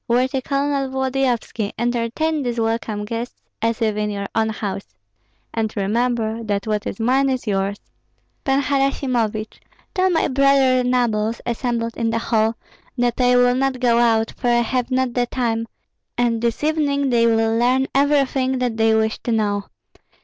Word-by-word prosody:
Worthy 255 Hz, +3 st, +1 dB
Colonel 275 Hz, 0 st, -1 dB
Volodyovski, 260 Hz, -5 st, -1 dB
entertain 240 Hz, +7 st, -1 dB
these 240 Hz, -3 st, -2 dB
welcome 225 Hz, -2 st, -1 dB
guests 230 Hz, +3 st, -5 dB, 0.2 s
as 230 Hz, +1 st, 0 dB
if 215 Hz, -2 st, +1 dB
in 210 Hz, 0 st, -1 dB
your 200 Hz, -1 st, -3 dB
own 220 Hz, 0 st, +1 dB
house, 200 Hz, -2 st, -5 dB, 0.6 s
and 220 Hz, -2 st, -1 dB
remember 225 Hz, +2 st, 0 dB
that 205 Hz, -2 st, -2 dB
what 215 Hz, -1 st, -2 dB
is -, -, -5 dB
mine 265 Hz, +4 st, +2 dB
is 255 Hz, -2 st, -2 dB
yours. 200 Hz, -1 st, -1 dB, 0.7 s
Pan 275 Hz, 0 st, +1 dB
Harasimovich, 255 Hz, -6 st, -1 dB, 0.3 s
tell 375 Hz, -2 st, +2 dB
my 345 Hz, -, +2 dB
brother 270 Hz, -2 st, +3 dB
nobles 235 Hz, -3 st, 0 dB
assembled 235 Hz, -1 st, -2 dB
in 230 Hz, -1 st, -1 dB
the 225 Hz, -, 0 dB
hall, 225 Hz, -1 st, +1 dB, 0.4 s
that 245 Hz, 0 st, 0 dB
I 250 Hz, 0 st, +4 dB
will 245 Hz, 0 st, +4 dB
not 265 Hz, 0 st, 0 dB
go 240 Hz, -2 st, +3 dB
out, 225 Hz, -1 st, +2 dB
for 250 Hz, -, -3 dB
I 240 Hz, 0 st, +4 dB
have 245 Hz, +1 st, -1 dB
not 260 Hz, -1 st, 0 dB
the 245 Hz, 0 st, 0 dB
time, 230 Hz, -2 st, -1 dB, 0.5 s
and 235 Hz, -2 st, +1 dB
this 235 Hz, +3 st, -1 dB
evening 285 Hz, -3 st, +1 dB
they 235 Hz, -1 st, +4 dB
will 225 Hz, 0 st, +2 dB
learn 250 Hz, +3 st, +2 dB
everything 275 Hz, -2 st, +2 dB
that 245 Hz, -3 st, -1 dB
they 225 Hz, 0 st, +3 dB
wish 220 Hz, 0 st, 0 dB
to 240 Hz, -, -3 dB
know. 205 Hz, -2 st, 0 dB
240 Hz, 165 wpm, -21 LUFS, 225-260 Hz, 0.7 s, I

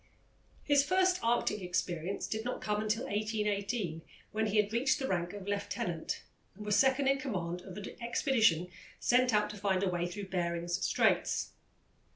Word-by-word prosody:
His 285 Hz, -1 st, +4 dB
first 370 Hz, +3 st, +3 dB
Arctic 230 Hz, -3 st, +1 dB
experience 180 Hz, 0 st, -2 dB
did 220 Hz, 0 st, -3 dB
not 250 Hz, -, -3 dB
come 210 Hz, 0 st, -1 dB
until 215 Hz, +3 st, 0 dB
1818, 205 Hz, -4 st, -1 dB, 0.3 s
when 220 Hz, +1 st, 0 dB
he 210 Hz, +1 st, 0 dB
had 210 Hz, 0 st, +2 dB
reached 260 Hz, +5 st, +2 dB
the 265 Hz, -2 st, -2 dB
rank 175 Hz, -4 st, -1 dB
of 205 Hz, -1 st, -8 dB
lieutenant 190 Hz, -4 st, -2 dB, 0.3 s
and 210 Hz, +2 st, -9 dB
was 210 Hz, -1 st, +2 dB
second 265 Hz, +2 st, +4 dB
in 275 Hz, 0 st, +3 dB
command 180 Hz, -10 st, -3 dB
of 185 Hz, +1 st, -10 dB
an 205 Hz, -, -6 dB, 0.2 s
expedition 225 Hz, -, +2 dB, 0.3 s
sent 250 Hz, +1 st, +3 dB
out 210 Hz, -1 st, +2 dB
to 210 Hz, -, -9 dB
find 195 Hz, -1 st, +1 dB
a -, -, +2 dB
way 175 Hz, -1 st, -1 dB
through 195 Hz, +2 st, -6 dB
Behring's 170 Hz, -1 st, -1 dB
Straits. -, -, +2 dB
210 Hz, 170 wpm, -32 LUFS, 180-235 Hz, 0.3 s, His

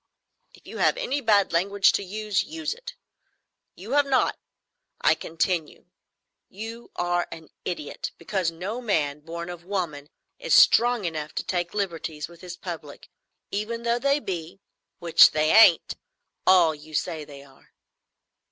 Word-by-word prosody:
"If -, -, -22 dB
you -, -, -8 dB
have -, -, +3 dB
any 290 Hz, -, -2 dB
bad 205 Hz, -6 st, +3 dB
language 195 Hz, +3 st, +3 dB
to -, -, -1 dB
use, 210 Hz, +1 st, -1 dB
use 320 Hz, +3 st, -4 dB
it. 485 Hz, +1 st, -10 dB, 0.8 s
You 205 Hz, +6 st, -10 dB
have 285 Hz, 0 st, +3 dB
not. 265 Hz, -2 st, +2 dB, 0.6 s
I -, -, +4 dB
continue. 165 Hz, -1 st, -3 dB, 0.6 s
You 225 Hz, +4 st, -8 dB
are 175 Hz, 0 st, 0 dB
an 160 Hz, -1 st, -10 dB, 0.2 s
idiot, 155 Hz, -4 st, -5 dB
because 180 Hz, 0 st, -1 dB
no 190 Hz, +9 st, -5 dB
man 150 Hz, -10 st, 0 dB
born 170 Hz, +2 st, -7 dB
of 175 Hz, -1 st, -8 dB
woman 170 Hz, -7 st, -4 dB, 0.3 s
is -, -, +2 dB
strong 240 Hz, -3 st, +5 dB
enough 155 Hz, -3 st, -4 dB
to -, -, -2 dB
take 175 Hz, 0 st, -3 dB
liberties 165 Hz, -6 st, -3 dB
with 170 Hz, 0 st, -16 dB
his 180 Hz, -1 st, -8 dB
public, 160 Hz, -5 st, -8 dB, 0.4 s
even 225 Hz, +3 st, -3 dB
though 235 Hz, 0 st, +1 dB
they 280 Hz, +2 st, +2 dB
be—which 170 Hz, -, +1 dB
they 155 Hz, 0 st, +1 dB
ain't—all 185 Hz, -, +3 dB
you 155 Hz, +1 st, -11 dB
say 160 Hz, 0 st, -2 dB
they 140 Hz, -1 st, -12 dB
are." 135 Hz, -1 st, -21 dB
180 Hz, 145 wpm, -25 LUFS, 165-225 Hz, 0.8 s, strong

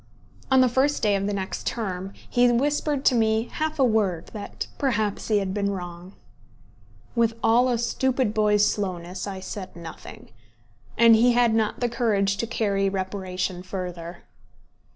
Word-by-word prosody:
On 265 Hz, -1 st, +5 dB
the 255 Hz, -, +5 dB
first 265 Hz, +4 st, +1 dB
day 205 Hz, -2 st, +3 dB
of 195 Hz, 0 st, -1 dB
the -, -, -1 dB
next 190 Hz, -1 st, -4 dB
term 190 Hz, -4 st, -3 dB, 0.2 s
he 245 Hz, -1 st, +3 dB
whispered 285 Hz, +2 st, 0 dB
to -, -, +5 dB
me 220 Hz, 0 st, +1 dB
half 315 Hz, 0 st, -2 dB
a 275 Hz, -, +3 dB
word 205 Hz, -8 st, +1 dB
that 210 Hz, -2 st, -6 dB
perhaps 220 Hz, -7 st, -1 dB
he 215 Hz, -, +3 dB
had 195 Hz, -2 st, -1 dB
been 200 Hz, -1 st, 0 dB
wrong. 180 Hz, -1 st, -7 dB, 1.0 s
With 230 Hz, -1 st, +2 dB
all 235 Hz, +3 st, +4 dB
a 240 Hz, -, +1 dB
stupid 250 Hz, 0 st, 0 dB
boy's 210 Hz, -1 st, +3 dB
slowness, 185 Hz, -2 st, -3 dB
I 195 Hz, -1 st, -5 dB
said 190 Hz, 0 st, -7 dB
nothing; 170 Hz, -1 st, -11 dB, 0.7 s
and 230 Hz, 0 st, +7 dB
he 240 Hz, +2 st, +4 dB
had 240 Hz, -2 st, +3 dB
not 220 Hz, 0 st, 0 dB
the 245 Hz, -, +2 dB
courage 205 Hz, -5 st, +1 dB
to 230 Hz, -, -2 dB
carry 200 Hz, -4 st, 0 dB
reparation 185 Hz, -1 st, -3 dB
further. 180 Hz, -2 st, -6 dB
210 Hz, 160 wpm, -25 LUFS, 190-240 Hz, 1.0 s, and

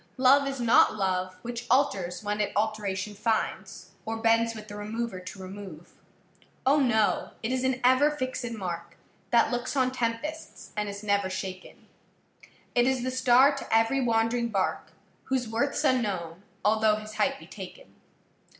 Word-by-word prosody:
Love 275 Hz, +2 st, +5 dB
is 275 Hz, -1 st, -4 dB
not 235 Hz, -2 st, +5 dB
love 185 Hz, -2 st, -1 dB
Which 240 Hz, 0 st, -5 dB
alters 200 Hz, -10 st, +1 dB
when 210 Hz, 0 st, -1 dB
it 205 Hz, -, -1 dB
alteration 210 Hz, -1 st, -1 dB
finds, 195 Hz, -3 st, -2 dB
Or 225 Hz, 0 st, -3 dB
bends 230 Hz, 0 st, +2 dB
with 215 Hz, -1 st, -9 dB
the 205 Hz, -, -8 dB
remover 215 Hz, 0 st, -4 dB
to 185 Hz, +2 st, -9 dB
remove: 185 Hz, -3 st, -9 dB, 0.7 s
O, 280 Hz, +3 st, +5 dB
no! 220 Hz, -6 st, +1 dB
it 225 Hz, -, -1 dB
is 260 Hz, 0 st, 0 dB
an 260 Hz, 0 st, +1 dB
ever 260 Hz, +4 st, +5 dB
fixed 255 Hz, -4 st, -3 dB
mark, 175 Hz, -5 st, -5 dB, 0.3 s
That 235 Hz, +1 st, +4 dB
looks 245 Hz, +3 st, -2 dB
on 255 Hz, -2 st, +2 dB
tempests 255 Hz, +6 st, -4 dB
and 210 Hz, -1 st, -2 dB
is 200 Hz, +1 st, -7 dB
never 200 Hz, -2 st, +1 dB
shaken; 185 Hz, 0 st, -7 dB, 0.9 s
It 245 Hz, 0 st, +3 dB
is 260 Hz, -2 st, +1 dB
the 255 Hz, -, -1 dB
star 260 Hz, +2 st, +5 dB
to -, -, -7 dB
every 225 Hz, +4 st, +3 dB
wandering 235 Hz, 0 st, +1 dB
bark, 195 Hz, -4 st, -1 dB, 0.3 s
Whose 265 Hz, -2 st, 0 dB
worthâs 230 Hz, +6 st, -1 dB
unknown, 190 Hz, -9 st, -1 dB, 0.2 s
although 215 Hz, 0 st, +4 dB
his 215 Hz, 0 st, -8 dB
height 275 Hz, +5 st, +1 dB
be -, -, -13 dB
taken. -, -, -11 dB
225 Hz, 160 wpm, -27 LUFS, 200-255 Hz, 0.9 s, Love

